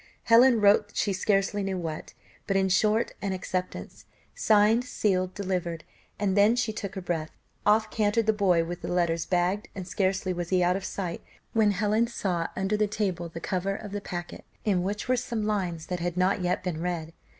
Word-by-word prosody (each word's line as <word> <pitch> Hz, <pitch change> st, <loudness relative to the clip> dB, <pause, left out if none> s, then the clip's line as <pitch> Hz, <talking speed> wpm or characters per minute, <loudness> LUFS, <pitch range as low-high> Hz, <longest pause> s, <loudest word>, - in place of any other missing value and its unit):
Helen 235 Hz, +1 st, +6 dB
wrote 205 Hz, 0 st, +4 dB
she 200 Hz, -, +1 dB
scarcely 195 Hz, +1 st, +1 dB
knew 195 Hz, -1 st, -2 dB
what, 160 Hz, -3 st, -5 dB, 0.3 s
but 195 Hz, -, +2 dB
in 190 Hz, 0 st, +2 dB
short 215 Hz, +5 st, +2 dB
an 200 Hz, -2 st, -1 dB
acceptance, 185 Hz, 0 st, -5 dB, 0.3 s
signed, 215 Hz, +2 st, +4 dB
sealed, 185 Hz, -6 st, 0 dB
delivered, 180 Hz, -4 st, -3 dB, 0.3 s
and 200 Hz, -2 st, 0 dB
then 205 Hz, +3 st, +5 dB
she 225 Hz, -2 st, 0 dB
took 200 Hz, -3 st, -5 dB
breath. 160 Hz, -3 st, -2 dB, 0.4 s
Off 215 Hz, +1 st, +3 dB
cantered 215 Hz, +1 st, +1 dB
the 220 Hz, -, +3 dB
boy 185 Hz, -5 st, +3 dB
with 175 Hz, +1 st, -6 dB
the -, -, -5 dB
letters 170 Hz, -2 st, 0 dB
bagged, 185 Hz, +3 st, 0 dB
and 185 Hz, -2 st, -6 dB
scarcely 190 Hz, 0 st, 0 dB
was 175 Hz, -1 st, -4 dB
he 185 Hz, -1 st, +3 dB
out 180 Hz, +1 st, +3 dB
of 195 Hz, -, -4 dB
sight, 180 Hz, -4 st, -4 dB, 0.3 s
when 220 Hz, -2 st, +4 dB
Helen 210 Hz, +3 st, +1 dB
saw 180 Hz, -7 st, -2 dB
under 195 Hz, +2 st, 0 dB
the 210 Hz, 0 st, +2 dB
table 190 Hz, -5 st, -2 dB
the 165 Hz, -, -7 dB
cover 190 Hz, +3 st, -2 dB
of 210 Hz, -1 st, -8 dB
the 205 Hz, 0 st, -4 dB
packet, 175 Hz, -2 st, -6 dB, 0.2 s
in 195 Hz, -4 st, +2 dB
which 205 Hz, +5 st, -3 dB
were 255 Hz, -, +3 dB
some 235 Hz, -3 st, -2 dB
lines 180 Hz, -6 st, -2 dB
that 180 Hz, 0 st, -3 dB
had 175 Hz, 0 st, -3 dB
not 185 Hz, +2 st, +2 dB
yet 180 Hz, 0 st, 0 dB
been 170 Hz, -3 st, -3 dB
read. 165 Hz, -2 st, -3 dB
195 Hz, 195 wpm, -27 LUFS, 180-210 Hz, 0.4 s, Helen